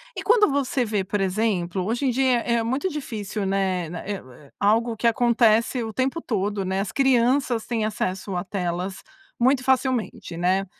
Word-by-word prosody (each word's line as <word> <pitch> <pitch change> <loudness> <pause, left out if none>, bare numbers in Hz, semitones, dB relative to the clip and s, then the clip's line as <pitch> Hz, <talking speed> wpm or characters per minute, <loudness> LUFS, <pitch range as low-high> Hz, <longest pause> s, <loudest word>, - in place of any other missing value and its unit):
e - - -4
quando 440 -1 +5
você 275 -2 0
vê 210 -3 -1
por 195 +1 -2
exemplo, 190 -2 0
hoje 240 +6 -1
em 255 - +3
dia 260 0 +2
é 235 0 +1
muito 260 +10 -1
difícil, 215 - -4
né. 190 -2 0
Eh - - -10
né 175 -1 -6
eh, 140 -6 -9
algo 225 +3 +2
que 230 +2 0
acontece 235 0 +3
o 225 - -4
tempo 260 +8 -1
todo, 205 -2 -1
né. 190 +1 -1
As 195 - -2
crianças 255 -2 +2
têm 225 -3 -1
acesso 195 -2 -3
a 180 - -1
telas 185 0 -3 0.4
muito 255 +1 +3
facilmente, 255 -8 0
né. 185 +3 +1
220 Hz, 180 wpm, -24 LUFS, 190-250 Hz, 0.4 s, quando